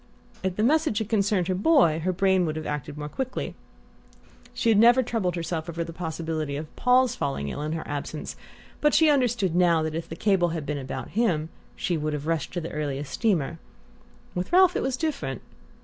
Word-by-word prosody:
If 190 -1 -2
the 210 - 0
message 305 -2 +2
had 220 -2 -2
concerned 200 -4 +1
her 185 - +1
boy 190 - +4
her 180 +3 0
brain 190 -1 +2
would 155 - -2
have 155 -1 -5
acted 150 0 -4
more 150 0 -4
quickly. 255 - -4 1.0
She 230 - 0
had 215 -2 +5
never 240 +3 +6
troubled 215 -7 -1
herself 165 -1 -3
over 170 0 -2
the 165 - -8
possibility 160 -3 -3
of 155 +1 -8
Paul's 250 -1 +3
falling 135 - -2
ill 145 - -5
in 155 +1 -2
her 160 - -5
absence, 145 +1 -5 0.4
but 300 0 +3
she 320 -2 +6
understood 240 - +1
now 170 -3 +4
that 155 0 -2
if 165 +1 -4
the 165 - -5
cable 185 -2 +2
had 155 - -5
been 145 -1 -2
about 130 -1 -6
him 175 -8 0 0.3
she 175 - -1
would 155 0 -2
have 150 0 -4
rushed 165 -3 -1
to 175 - -2
the 165 - -6
earliest 145 -2 -3
steamer. 170 - 0 0.7
With 180 0 -3
Ralph 365 0 +6
it - - 0
was 265 -1 -1
different. 285 - -3
175 Hz, 205 wpm, -26 LUFS, 155-225 Hz, 1.0 s, never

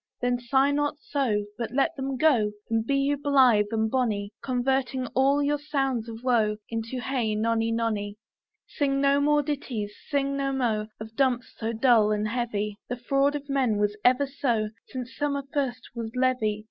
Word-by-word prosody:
Then 245 0 0
sigh 265 +3 +2
not 290 +1 0
so, 250 -9 -1
But 230 -2 -2
let 275 - +2
them 270 -1 -3
go, 240 -9 +3 0.2
And 225 -1 +2
be 275 +5 0
you 280 +1 +1
blith 260 -7 +4
and 220 0 0
bonny, 215 -6 0
Converting 260 0 0
all 275 +2 +3
your 290 +1 +1
sounds 270 -6 -1
of 225 +1 -9
woe 220 -4 +2
Into 230 +2 -4
Hey 240 -3 -1
nonny, 225 +1 +1
nonny. 215 -3 -1 0.5
Sing 275 -2 0
no 280 0 +3
more 295 0 +3
ditties, 250 -8 -3 0.2
sing 275 -1 0
no 275 -1 -1
mo 225 -5 0
Of 220 +1 -9
dumps 255 -2 +1
so 225 0 -3
dull 225 -2 +4
and 210 0 0
heavy; 210 -3 -2
The 245 - -3
fraud 275 +4 +1
of 285 -1 -5
men 265 -6 +1
was 205 0 +1
ever 255 +3 +4
so, 240 -6 -1 0.2
Since 255 -1 -7
summer 285 -1 -1
first 255 -4 -2
was 230 -2 -4
leavy. 250 -5 +1
250 Hz, 175 wpm, -26 LUFS, 220-275 Hz, 0.5 s, blith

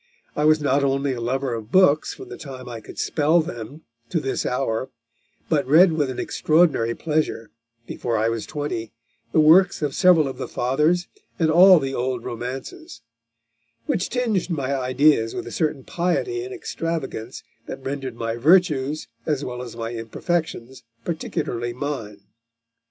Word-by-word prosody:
I 150 - +1
was 155 0 +5
not 140 -1 +1
only 135 0 +1
a 120 - -5
lover 130 +2 -1
of 115 -1 -6
books 170 -6 +4
from - - -11
the - - -8
time 130 -3 -9
I 115 -2 -7
could - - -12
spell 155 +3 +2
them 140 -1 -6 0.3
to 170 - 0
this 135 -3 -2
hour, 125 -1 -1 0.6
but 145 -5 +1
read 165 +6 +6
with 145 -4 0
an 130 - -5
extraordinary 155 -8 +2
pleasure, 155 -8 -2 0.3
before 115 -1 -2
I 110 +1 +1
was 115 -1 -2
twenty, 145 -7 -4 0.4
the - - +3
works 165 +3 +5
of 145 -2 -1
several 175 -6 +5
of 135 - -7
the - - -4
Fathers, 150 +8 +1 0.3
and 160 -3 +2
all 185 +3 +8
the 135 -3 -2
old 125 -1 -2
romances; 125 -1 -7 0.8
which 180 - -1
tinged 225 -8 0
my 140 -5 -1
ideas 130 -2 +2
with - - -4
a - - -8
certain 150 -5 -1
piety 180 - -1
and 385 - -7
extravagance 165 - -5 0.2
that 135 - -7
rendered 135 -3 -4
my 115 0 -3
virtues 155 -1 +3 0.2
as 145 -2 0
well 125 -1 -5
as 120 -2 -8
my 115 0 -4
imperfections 130 - -3 0.2
particularly 125 -8 -3
mine.... 120 -7 -5
140 Hz, 160 wpm, -23 LUFS, 120-160 Hz, 0.8 s, all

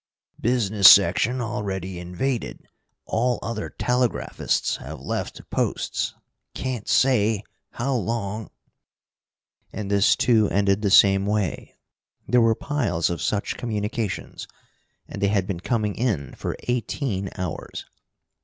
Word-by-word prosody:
"Business 110 -4 +5
section 100 +7 +5
already 95 -6 -4
invaded. 90 +9 -3 0.4
All 120 +1 0
other 115 -2 -4
telegraphists 125 -1 -1
have - - -9
left - - -5
posts. - - -1 0.4
Can't 125 -5 -4
say 110 -5 +3 0.3
how 135 +3 -1
long 110 -2 -2 0.6
" - - -50
And 105 -2 -5
this, 100 0 +4
too, 110 -4 +3
ended 100 -1 +2
in - - -11
the 105 - +1
same 95 0 +5
way. 105 -5 -2 0.5
There 125 -1 +4
were 115 -1 +4
piles 120 - -1
of 85 - -4
such 105 -1 -1
communications, 105 -2 -4 0.6
and - - -7
they 100 - +3
had 100 -2 +1
been 95 -3 -4
coming 105 +1 -1
in 100 - -2
for - - -5
eighteen 120 -4 -2
hours. 90 -3 -5
105 Hz, 125 wpm, -24 LUFS, 95-120 Hz, 0.6 s, Business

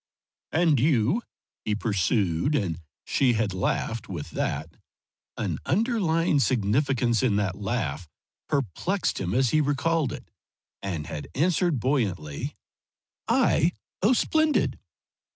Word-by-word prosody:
"And 160 -4 +3
you?" 140 - +2 0.4
he 105 - 0
pursued, 105 - +1
and 90 - -1 0.3
she 130 -3 +2
had 110 -3 0
laughed 115 +4 -2
with 85 -6 -6
that - - -3 0.6
an - - -2
underlying 175 - +2
significance 120 -1 +2
in 115 -6 +2
that 100 -3 0
laugh 90 - -2 0.4
perplexed 145 - -1
him 90 0 -2
as 130 -2 +3
he 155 - +4
recalled 145 0 +1
it, - - -9 0.5
and 85 -6 -3
had 75 - -6
answered 170 -1 +2
buoyantly: 100 - -1 0.7
"I? 170 +3 +3 0.3
Oh, 215 +7 +5
splendid!" 315 +4 +2
125 Hz, 115 wpm, -26 LUFS, 100-160 Hz, 0.7 s, Oh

